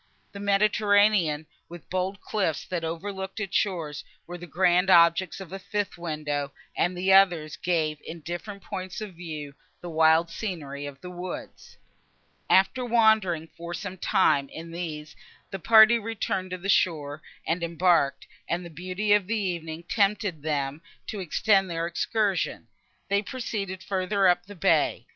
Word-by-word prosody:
The 200 - -9
Mediterranean, 205 -5 +3 0.2
with 175 0 -9
the - - -42
bold 185 +2 -2
cliffs, 190 -8 -1
that 175 -2 -3
overlooked 190 +4 -5
its 200 -3 -4
shores, 165 -8 -1 0.2
were 175 - -8
the 175 - -9
grand 180 +3 +3
objects 170 0 +5
of 190 -2 -9
a 195 - -5
fifth 205 +1 -3
window, 150 -4 -3 0.2
and 180 +1 0
the 190 +2 +3
others 175 -6 +4
gave, 160 -4 -1
in 165 0 -8
different 180 +5 -6
points 185 0 -6
of 210 -3 -7
view, 155 -4 -7 0.3
the 175 - -7
wild 160 +1 +4
scenery 145 -10 -5
of 140 -1 -10
the 180 - -8
woods. 180 0 -8 0.7
After 195 +7 +4
wandering, 220 -9 +3
for 170 +1 -6
some 195 +1 -6
time, 145 -9 +2
in 165 +1 -9
these, 155 -3 -6 0.4
the 195 - -4
party 220 +4 +7
returned 205 -4 -3
to 185 - -4
the 185 +2 -7
shore 155 -6 +1 0.2
and 165 +2 -1
embarked; 170 -3 +2 0.2
and, 175 +1 -1
the 170 - -9
beauty 185 +6 -1
of 205 -3 +3
the 225 +1 0
evening 170 -5 -3
tempting 200 -5 0
them 145 -1 -2 0.2
to 210 - -5
extend 195 +2 +2
their 165 -1 -2
excursion, 200 +3 -1 0.4
they 200 0 +2
proceeded 200 -6 -5
further 190 +1 +1
up 175 +1 +2
the 205 - -10
bay. 170 - +2
180 Hz, 155 wpm, -26 LUFS, 165-200 Hz, 0.7 s, party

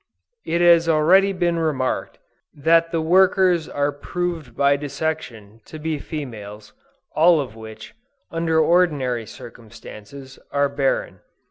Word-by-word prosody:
It 170 +1 0
has 170 -1 +5
already 180 +6 +4
been 175 -3 -1
remarked, 145 -5 -2 0.4
that 165 +3 +2
the 165 -2 -1
workers 180 0 +3
are 145 0 -1
proved 160 -3 -5
by 140 0 +3
dissection 140 -7 -5
to 155 - -10
be 155 -1 -3
females, 110 -10 -8 0.4
all 165 +1 +4
of 130 -6 -5
which, 110 - -11 0.4
under 165 -1 0
ordinary 150 -9 +1
circumstances, 120 +4 -12
are 140 0 +1
barren. 140 -1 -2
155 Hz, 120 wpm, -21 LUFS, 130-170 Hz, 0.4 s, has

